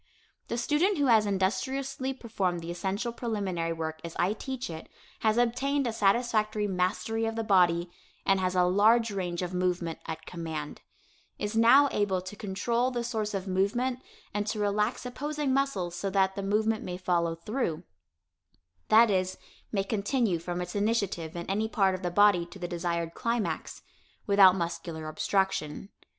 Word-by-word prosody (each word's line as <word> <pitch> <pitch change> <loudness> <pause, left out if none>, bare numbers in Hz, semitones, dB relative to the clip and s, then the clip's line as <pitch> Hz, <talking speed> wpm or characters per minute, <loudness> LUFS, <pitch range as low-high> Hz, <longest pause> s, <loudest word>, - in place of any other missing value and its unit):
The 235 - -2
student 310 - +2
who 285 - +2
has 220 -4 +5
industriously 235 +8 -1
performed 195 -9 -2
the 165 +1 -5
essential 200 +6 -2
preliminary 195 -8 -2
work 160 -1 -4
as 170 -1 -7
I 185 +4 +2
teach 260 +3 -5
it 160 -1 -8 0.3
has 220 0 +2
obtained 260 +4 +1
a 235 - -1
satisfactory 215 0 +1
mastery 200 +4 -1
of 225 - -3
the 225 - -1
body, 175 -4 +3 0.3
and 195 0 +3
has 185 0 0
a 180 - +4
large 215 +5 +4
range 180 -3 -3
of 180 0 -4
movement 180 -2 -1
at 160 - -6
command; 160 -4 -6 0.6
is 205 +1 -3
now 240 +6 +7
able 200 -3 +1
to 185 +3 -8
control 230 +5 -1
the 240 -2 -3
source 220 -3 -2
of 195 0 -4
movement 240 +7 0 0.3
and 205 0 -1
to 215 - -2
relax 210 +4 0
opposing 290 +2 -2
muscles 265 -11 0
so 195 +3 -2
that 190 0 +2
the 200 - -3
movement 215 +2 +1
may 180 0 -5
follow 170 -2 0
through; 170 - -3 1.0
that 225 0 +6
is, 185 -1 0 0.3
may 195 -3 +1
continue 205 -1 0
from 175 +1 -4
its 180 0 -5
initiative 200 -6 -1
in 170 0 -4
any 215 +3 0
part 195 -4 +2
of 185 - -4
the 180 - -1
body 200 -1 +5
to 175 - -12
the 180 -2 -4
desired 170 -1 -2
climax, 230 -2 -2 0.4
without 195 -2 +7
muscular 170 -2 -4
obstruction. 190 0 -1
200 Hz, 165 wpm, -29 LUFS, 180-230 Hz, 1.0 s, now